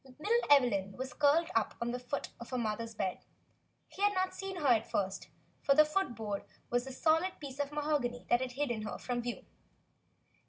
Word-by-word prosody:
Little 450 +10 +1
Evelyn 235 -9 +4
was 260 +1 -5
curled 300 +3 +3
up 225 -2 +1
on 235 0 -1
the 250 - -3
foot 250 +3 -4
of 235 - -9
her 255 - -2
mother's 225 0 -2
bed; 190 -3 -2 0.7
he 390 - -11
had 410 0 +3
not 370 0 +1
seen 390 -1 -5
her 330 -5 -4
at 225 -2 +3
first, 195 0 -2 0.3
for 275 - +4
the 305 +1 +8
foot 305 -4 -1
board 210 -3 -3 0.3
was 245 +2 +1
a - - -5
solid 325 +7 +2
piece 280 -2 -8
of 285 0 -1
mahogany 290 -5 -1
that 240 - +3
had 255 -1 -3
hidden 245 -5 -1
her 215 - -4
from 245 -1 -2
view. 240 0 -5
255 Hz, 200 wpm, -33 LUFS, 235-300 Hz, 0.7 s, the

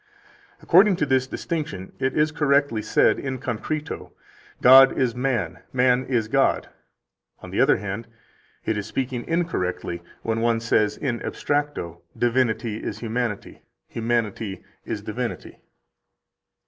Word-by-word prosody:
15 - - -26
According 190 +3 +6
to 155 - 0
this 130 -2 +1
distinction 140 - -4
it 130 0 -1
is 155 0 +3
correctly 140 -6 +2
said - - +3
in 130 -1 -3
concreto: 140 +6 -4 0.5
God 135 +1 +8
is 125 -3 +1
man, 120 -9 -1
man 125 0 +3
is 120 -4 0
God. - - +1 0.7
On - - -9
the - - +1
other - - +5
hand, 100 +3 -5 0.6
it 110 -2 0
is 100 - -6
speaking 125 0 -3
incorrectly 90 - -2 0.2
when 115 0 -1
one 115 0 +2
says 110 -2 +1
in 120 -5 -2
abstracto: 145 - -2 0.2
Divinity 120 -2 +1
is 105 - -5
humanity, 115 -1 -3 0.3
humanity 115 -3 -2 0.2
is - - -4
divinity. - - -5
120 Hz, 130 wpm, -24 LUFS, 110-135 Hz, 0.7 s, God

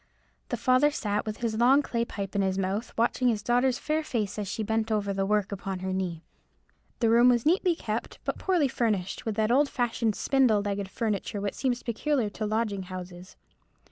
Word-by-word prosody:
The - - -1
father 255 +3 +4
sat 210 -7 -2
with 215 +1 -5
his 225 -2 -1
long 265 +4 +5
clay 235 -3 -1
pipe 200 -4 -6
in 200 - +2
his 190 -1 0
mouth, 195 +5 -2
watching 240 +2 +2
his 215 -4 +1
daughter's 245 +2 +2
fair 310 +1 -1
face 215 -7 -2
as 205 - -3
she 215 +3 -3
bent 220 +1 -1
over 205 -2 0
the 195 0 -1
work 210 -1 +1
upon 195 -1 -4
her 190 0 -2
knee. 180 -3 -3 0.8
The 230 - +4
room 240 +2 +6
was 240 -2 +2
neatly 350 +2 +3
kept, 220 -6 -4
but - - -3
poorly 355 -7 +2
furnished, 215 -6 -1
with 220 - -1
that 220 +1 +1
old 280 +3 +4
fashioned 235 -3 0
spindle 250 -7 +3
legged 200 -1 -3
furniture 210 -1 -2
which 200 0 -2
seems 250 -2 -1
peculiar 240 -1 0
to 215 0 -3
lodging 215 -2 -1
houses. 180 0 -9
220 Hz, 200 wpm, -27 LUFS, 200-245 Hz, 0.8 s, room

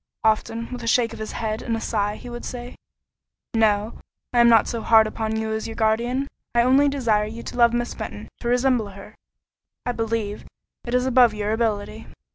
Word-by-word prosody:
Often, 225 +2 0
with 250 -1 -5
a 230 - -6
shake 230 0 +2
of - - -9
his 220 - -5
head 220 0 -3
and 230 -2 -2
a - - -4
sigh, 210 -2 -1
would 240 0 -7
he - - -5
say, 245 0 -7 0.8
"No; 215 -1 +1 0.3
I 240 - +3
am 235 0 +7
not 225 -2 +5
so 230 - -3
hard 220 -1 +6
upon 220 0 -3
you 220 0 -2
as 220 - -3
your 225 - -7
guardian: 235 +4 0 0.3
I 235 - +5
only 270 +3 +4
desire 225 -7 +1
you 230 +2 -8
to - - -7
love 235 -1 +5
Miss 240 0 -2
Fenton; 105 +1 -7
to - - -5
resemble 245 -2 +2
her, 195 - -12 0.7
I 245 - 0
believe, 225 -3 -3 0.4
is 250 +1 +1
above 250 -4 +5
your 210 0 -2
ability." 220 -1 -2
230 Hz, 200 wpm, -23 LUFS, 220-240 Hz, 0.8 s, am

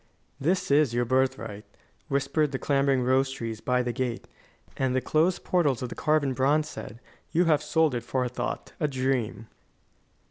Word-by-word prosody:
"This 170 +3 0
is 140 -4 +4
your 120 0 +1
birthright," 130 -4 0 0.4
whispered 140 +2 +1
the 135 - -2
clambering 135 -1 +2
rose 130 +2 +2
trees 115 -4 -5
by 125 0 +1
the 120 -1 -2
gate; 125 -1 -3 0.5
and 130 -1 0
the - - +3
closed 160 +7 +1
portals 145 -9 +1
of 125 - -5
carven 150 -3 +1
bronze 145 +4 +2
said: 115 -6 -8 0.3
"You 175 +3 +3
have 155 -3 +3
sold 160 -4 +2
it 120 - -1
for 125 +2 -1
a - - -2
thought 125 - -4
a 150 - +1
dream." 130 -5 -1
135 Hz, 170 wpm, -27 LUFS, 125-150 Hz, 0.5 s, is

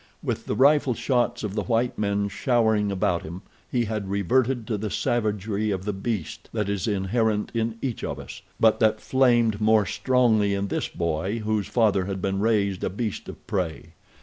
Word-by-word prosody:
With - - -3
the - - -1
rifle 140 -1 +4
shots 120 -2 0
of 105 -3 -3
the 105 - -1
white 120 +1 +1
men 100 -1 0
showering 110 -1 +1
about 90 -2 0
him 85 +5 -8 0.3
he 120 -2 +1
had 105 -3 -3
reverted 120 +5 +1
to 110 - -2
the 105 +1 -3
savagery 105 -1 -1
of 95 -2 -2
the 105 - -1
beast 95 -5 -4
that 105 -3 -1
is 100 +2 -1
inherent 105 +2 0
in 115 -1 -1
each 130 -4 -3
of - - -3
us, - - -9 0.2
but 110 -1 +4
that 110 -2 +3
flamed 120 -5 +2
more 110 -1 +4
strongly 110 -6 +2
in 100 0 -2
this - - -1
boy 85 +5 -2
whose 110 -2 0
father 105 -5 +2
had 95 0 -4
been 95 +1 -1
raised 100 -3 +1
a - - 0
beast 105 +1 -4
of - - -11
prey. 85 -5 -3
105 Hz, 185 wpm, -25 LUFS, 100-115 Hz, 0.3 s, rifle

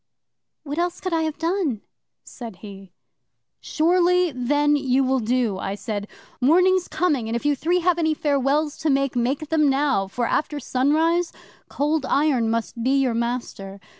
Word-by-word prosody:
'"What 290 +2 -4
else 350 0 -1
could 370 -2 -4
I 325 - +1
have 315 -1 -2
done?" 330 - -1 0.4
said 230 -5 -9
he. 195 -2 -11 0.7
'"Surely, 355 +2 +2
then, 290 +3 +1
you 270 -2 +1
will 260 0 +1
do," 230 -4 0
I 195 +1 -3
said. 205 -1 -5 0.3
"Morning's 365 +6 +3
coming, 285 -11 -1
and 230 - -2
if 235 - -4
you 295 -1 +3
three 350 +6 0
have 345 0 +2
any 315 -1 +1
farewells 290 +1 0
to 315 - -1
make, 275 -2 +1
make 265 +5 -1
them 305 -3 +3
now, 270 -7 +1
for, 240 +5 -2
after 295 +4 -1
sunrise, 315 +7 +1 0.4
Cold 295 -1 -1
Iron 270 -6 +2
must 230 +1 -3
be 265 +3 +2
your 260 -3 +1
master." 230 -4 -4
280 Hz, 165 wpm, -23 LUFS, 240-320 Hz, 0.7 s, Morning's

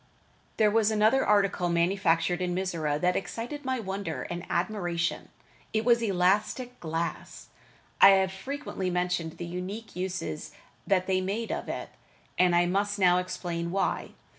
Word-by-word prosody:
There 215 -1 +4
was 220 -1 +3
another 220 +5 +3
article 200 -4 +2
manufactured 170 0 +2
in 180 -1 -1
Mizora 165 -6 -1
that 180 0 +2
excited 235 +10 -4
my 260 -1 -1
wonder 195 -1 -4
and 175 0 -5
admiration. 175 -3 -1 0.4
It 220 0 0
was 235 -1 +4
elastic 210 +5 +1
glass. 165 +1 -4 0.5
I 195 - +11
have 190 -1 +1
frequently 195 -2 -4
mentioned 180 -2 -1
the 175 - -5
unique 185 +6 -6
uses 180 - -4 0.3
that 185 -2 +2
they 185 0 +1
made 205 +5 -2
of - - -4
it, - - -4 0.5
and 180 -1 +4
I 175 0 +4
must 200 +3 0
now 180 -2 +4
explain 170 -2 -4
why. 195 +2 -1
185 Hz, 145 wpm, -28 LUFS, 175-210 Hz, 0.5 s, I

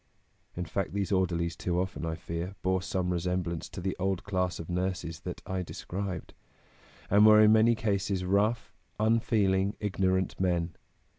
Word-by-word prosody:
" - - -33
In 90 - -2
fact, 95 +1 -3
these 100 0 -1
orderlies 85 -3 +1
too 90 -1 -1
often, 90 -2 -3
I 80 - -2
fear, 85 +3 -5
bore 95 0 +1
some 90 -2 -1
resemblance 90 -1 -2
to - - -7
the 95 +1 -2
old 95 -1 -1
class 90 -3 -1
of 80 - -6
nurses 90 -2 -2
that - - -7
I 95 -1 -2
described, 90 0 -5 0.8
and 100 +2 +6
were 110 0 +8
in 105 0 +7
many 110 +2 +5
cases 100 -3 -1
rough, 100 +3 +1 0.3
unfeeling, 105 -3 +2
ignorant 95 -2 0
men. 85 -3 0
95 Hz, 160 wpm, -29 LUFS, 90-100 Hz, 0.8 s, were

